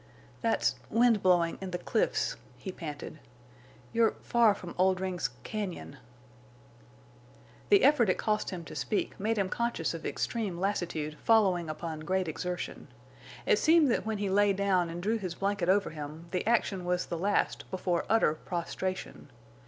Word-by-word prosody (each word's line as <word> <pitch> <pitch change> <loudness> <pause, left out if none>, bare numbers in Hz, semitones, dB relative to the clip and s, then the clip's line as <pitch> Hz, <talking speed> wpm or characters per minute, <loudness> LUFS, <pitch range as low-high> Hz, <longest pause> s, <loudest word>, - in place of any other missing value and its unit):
"That's—wind 230 -2 +2
blowing—in 180 +1 +2
the—cliffs," 180 - 0 0.2
he 190 - -6
panted. 155 -3 -7 0.7
"You're 230 -1 +3
far 230 -3 +4
from 180 -3 -8
Oldring's—cañon." 185 - -2 1.7
The 200 - +6
effort 260 -6 +5
it 185 - +2
cost 210 -1 0
him 180 -3 -5
to - - -9
speak 210 - -2
made 220 +3 0
him 195 -2 +1
conscious 235 -7 -1
of 165 - -7
extreme 210 -7 -2
lassitude 165 -6 -2
following 190 -7 +3
upon 155 0 -5
great 185 +3 -1
exertion. 180 +3 -4 0.6
It - - +4
seemed 320 -4 +5
that - - +1
when 220 -1 -2
he 200 0 -1
lay 205 0 +4
down 190 -3 +1
and 170 +1 -6
drew 220 +3 +1
his 180 -4 -4
blanket 195 -2 -1
over 200 -1 +3
him 155 +2 -8
the 180 +2 -2
action 210 -5 +1
was 180 0 0
the 170 - -4
last 205 +3 0
before 180 -2 -1
utter 225 -8 +4
prostration. 175 0 -4
185 Hz, 145 wpm, -30 LUFS, 170-210 Hz, 1.7 s, The